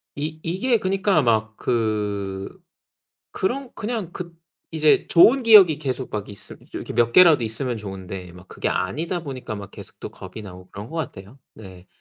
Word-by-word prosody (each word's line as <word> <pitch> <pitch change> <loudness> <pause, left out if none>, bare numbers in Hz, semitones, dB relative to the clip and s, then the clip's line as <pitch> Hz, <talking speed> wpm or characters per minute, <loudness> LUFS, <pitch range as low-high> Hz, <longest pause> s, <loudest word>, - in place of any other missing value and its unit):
이 155 +2 -4
이게 195 +9 +1
그니까 195 -3 +1
막 110 -3 +1
그 105 -4 -2 0.7
그런 250 +6 -3
그냥 215 -5 -4
그 175 -1 -7 0.4
이제 155 -2 +3
좋은 235 +10 +6
기억이 200 - +7
계속 130 -3 -4
막 105 -2 -4
있으 100 - -10 0.2
이렇게 - - -6
몇 120 0 +2
개라도 165 -7 +7
있으면 120 +2 -3
좋은데 95 -3 -7
막 90 +1 -15
그게 - - -3
아니다 165 - -2
보니까 130 -6 -6
막 100 0 -9
계속 - - -13
또 - - -6
겁이 95 +4 -10
나고 90 -2 -12
그런 100 +2 -8
것 165 - -6
같아요. 125 -5 -7 0.2
네. 95 -4 -13
125 Hz, 310 characters per minute, -23 LUFS, -, 0.7 s, 기억이